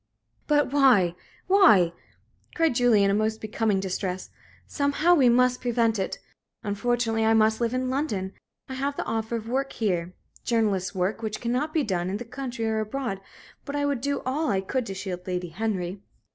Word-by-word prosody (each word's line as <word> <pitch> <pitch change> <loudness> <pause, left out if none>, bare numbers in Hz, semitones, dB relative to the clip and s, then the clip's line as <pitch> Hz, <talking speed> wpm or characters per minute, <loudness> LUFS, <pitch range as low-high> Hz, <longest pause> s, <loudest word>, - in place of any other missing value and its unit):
"But 290 -2 +2
why? 245 -12 +5 0.3
why?" 215 - +5 0.6
cried 325 -4 +2
Julie, 240 -4 +4
in 195 - +3
a - - +1
most 215 +1 0
becoming 215 -2 0
distress. 185 -1 -3 0.3
"Somehow, 290 +5 +2
we 270 -8 +5
must 250 +1 +3
prevent 230 -3 +1
it. 190 - -2 0.5
Unfortunately 225 +2 0
I 225 0 +4
must 220 +1 +3
live 230 -1 +1
in 255 0 -1
London. 210 -9 -2 0.3
I 265 - -6
have 275 +2 -2
the - - -2
offer 225 +1 -2
of 225 -1 -5
work 270 +3 -1
here 180 -5 -1 0.3
journalist's 205 -6 0
work 190 +5 -1
which 215 -1 -3
cannot 250 +6 -1
be 310 -2 +1
done 180 -5 -1
in 195 - -2
the 240 - -7
country 245 -1 -5
or 220 0 0
abroad. 215 -2 -3 0.4
But 285 - -6
I 285 0 0
would 280 -4 -1
do 280 +1 -2
all 290 +5 0
I 195 - +1
could 250 +5 -2
to 195 - -5
shield 185 -2 -6
Lady 180 -1 -3
Henry." 190 0 -3
225 Hz, 185 wpm, -26 LUFS, 195-260 Hz, 0.6 s, why